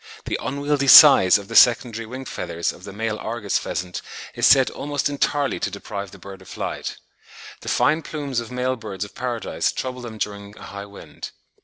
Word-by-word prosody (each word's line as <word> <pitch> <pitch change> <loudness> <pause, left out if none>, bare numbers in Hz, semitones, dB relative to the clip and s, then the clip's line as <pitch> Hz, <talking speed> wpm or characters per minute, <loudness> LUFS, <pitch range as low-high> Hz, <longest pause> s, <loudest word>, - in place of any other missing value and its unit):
The - - -3
"unwieldy 140 +1 -1
size" 135 - +9
of 100 -1 -10
the 115 - -7
secondary 115 -2 +4
wing 130 +3 -8
feathers 85 -8 -3
of 90 - -14
the 100 - -8
male 110 +1 -3
Argus 110 -3 -2
pheasant 90 0 -5 0.3
is - - +2
said 135 -1 +5
"almost 145 0 -2
entirely 145 0 -1
to - - -2
deprive 100 -1 -7
the 100 - -14
bird 95 0 -11
of 95 - -15
flight." - - -5 0.6
The - - -7
fine 155 +2 +2
plumes 145 -6 -4
of 115 - -7
male 125 +1 -1
birds 105 -4 -6
of 100 - -14
paradise 120 -3 -2
trouble 130 -1 -5
them 115 -2 -8
during 100 -1 -6
a - - -12
high 100 0 -8
wind. 100 - -10
115 Hz, 190 wpm, -22 LUFS, 100-130 Hz, 0.6 s, size